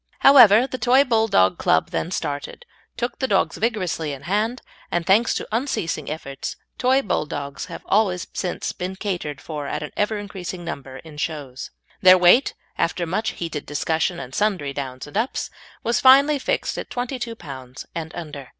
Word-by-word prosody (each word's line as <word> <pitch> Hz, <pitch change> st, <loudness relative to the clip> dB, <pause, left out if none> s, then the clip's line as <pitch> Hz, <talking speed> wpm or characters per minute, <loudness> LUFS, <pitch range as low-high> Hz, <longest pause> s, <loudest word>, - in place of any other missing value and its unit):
However, 245 Hz, -4 st, +8 dB
the 255 Hz, -1 st, -5 dB
Toy 260 Hz, +3 st, +5 dB
Bulldog 220 Hz, -, +3 dB
Club -, -, +2 dB
then -, -, -2 dB
started, 145 Hz, -, -4 dB, 0.3 s
took 240 Hz, 0 st, -3 dB
the 260 Hz, -, 0 dB
dogs 190 Hz, -6 st, +1 dB
vigorously 185 Hz, -9 st, -1 dB
in 135 Hz, -, -9 dB
hand, 215 Hz, +7 st, -1 dB, 0.3 s
and 175 Hz, -1 st, -1 dB
thanks 215 Hz, +6 st, +4 dB
to -, -, -3 dB
unceasing 215 Hz, -, -2 dB
efforts, 140 Hz, -3 st, -5 dB, 0.2 s
Toy 260 Hz, +2 st, +3 dB
Bulldogs 145 Hz, -, -3 dB
have -, -, -9 dB
always 190 Hz, -4 st, +2 dB
since 180 Hz, -2 st, -3 dB
been 185 Hz, +1 st, -5 dB
catered 180 Hz, -8 st, -4 dB
for 150 Hz, -3 st, -6 dB
at -, -, -3 dB
an 150 Hz, -, -6 dB
ever 210 Hz, +1 st, 0 dB
increasing 185 Hz, -3 st, -6 dB
number 135 Hz, -5 st, -6 dB
of 150 Hz, -2 st, -8 dB
shows. 140 Hz, -5 st, -4 dB, 0.3 s
Their 185 Hz, -1 st, +8 dB
weight, 180 Hz, +9 st, +5 dB, 0.2 s
after 175 Hz, +1 st, 0 dB
much 195 Hz, +7 st, -1 dB
heated 165 Hz, -4 st, -5 dB
discussion 160 Hz, +4 st, -1 dB
and 125 Hz, -, -8 dB
sundry 185 Hz, -9 st, 0 dB
downs 130 Hz, -2 st, -5 dB
and 145 Hz, -, -13 dB
ups, 225 Hz, +5 st, -1 dB, 0.3 s
was 235 Hz, +1 st, +1 dB
finally 280 Hz, +3 st, +6 dB
fixed -, -, -1 dB
at -, -, -7 dB
twenty 250 Hz, +1 st, -3 dB
two 230 Hz, -1 st, -4 dB
pounds 130 Hz, -, -9 dB
and 160 Hz, -1 st, -5 dB
under. 145 Hz, -5 st, -7 dB
180 Hz, 170 wpm, -23 LUFS, 150-225 Hz, 0.3 s, However